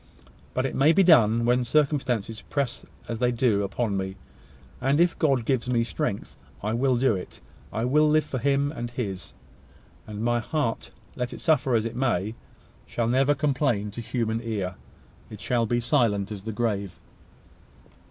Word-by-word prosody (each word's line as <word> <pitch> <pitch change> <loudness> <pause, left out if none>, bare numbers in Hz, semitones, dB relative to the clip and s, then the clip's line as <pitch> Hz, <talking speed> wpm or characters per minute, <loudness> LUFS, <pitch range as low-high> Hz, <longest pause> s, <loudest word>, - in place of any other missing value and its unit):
But 130 - +1
it 135 - -2
may 150 +4 +4
be 195 - +5
done 115 - +5
when 125 +1 +3
circumstances 125 -6 0
press 140 -4 -3 0.2
as 115 -1 -4
they 125 0 +2
do 115 -4 +2
upon 100 +1 -1
me; 95 0 -3 0.7
and, 140 +3 +2
if 175 0 +2
God 135 -7 +2
gives 125 -1 0
me 120 -2 +2
strength, 120 -3 -3 0.3
I 105 +2 -1
will 130 +2 +2
do 125 -3 +3
it. 90 - -8 0.3
I 115 +2 -1
will 150 +4 +4
live 155 0 +4
for 130 - -4
Him 140 +2 +1
and 120 -6 -5
his; 105 -7 -5 0.7
and 105 0 -5
my 120 0 +2
heart, 120 -1 -2 0.3
let 125 -1 -3
it - - -8
suffer 140 -6 +2
as 110 -1 +1
it 115 0 -4
may, 115 -5 0 0.5
shall 115 -1 -1
never 135 +4 +3
complain 135 -7 0
to 120 - -6
human 115 -1 -2
ear. 105 -6 -3 0.6
It - - -9
shall 120 -2 0
be 120 - +1
as 120 - -2
silent 115 -7 +2
as 105 -2 -6
the 110 +3 -5
grave." 100 -4 -2
120 Hz, 175 wpm, -26 LUFS, 110-135 Hz, 0.7 s, be